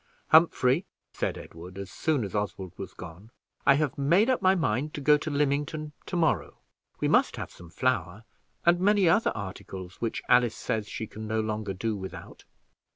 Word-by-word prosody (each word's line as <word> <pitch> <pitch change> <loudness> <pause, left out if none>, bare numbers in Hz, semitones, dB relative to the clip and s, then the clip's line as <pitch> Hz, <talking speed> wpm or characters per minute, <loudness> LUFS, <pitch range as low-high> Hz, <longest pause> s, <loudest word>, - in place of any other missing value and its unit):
"Humphrey," 160 -1 +4 0.3
said - - -2
Edward, 90 +3 -10
as 100 -1 -7
soon 155 -6 0
as 100 - -5
Oswald 95 -3 -3
was 95 -2 -7
gone, 90 +5 -10 0.4
"I 140 - +8
have 145 -2 -1
made 175 - +4
up 255 - 0
my 190 +1 +5
mind 150 - -1
to - - -4
go 150 +2 +6
to 155 - -4
Lymington 150 +1 -1 0.2
to - - -4
morrow 165 -3 +1 0.4
We - - +1
must - - +3
have - - -6
some 85 - -13
flour, 105 -2 -1 0.4
and 175 +1 +5
many 200 0 +4
other 205 +7 +4
articles, 95 -2 -7
which 115 -1 -2
Alice 120 -2 +4
says 110 -2 -2
she 110 - -4
can 110 0 -8
no 110 +1 0
longer 110 -2 -2
do 110 +3 -2
without." 95 -1 -9
120 Hz, 180 wpm, -28 LUFS, 100-155 Hz, 0.4 s, I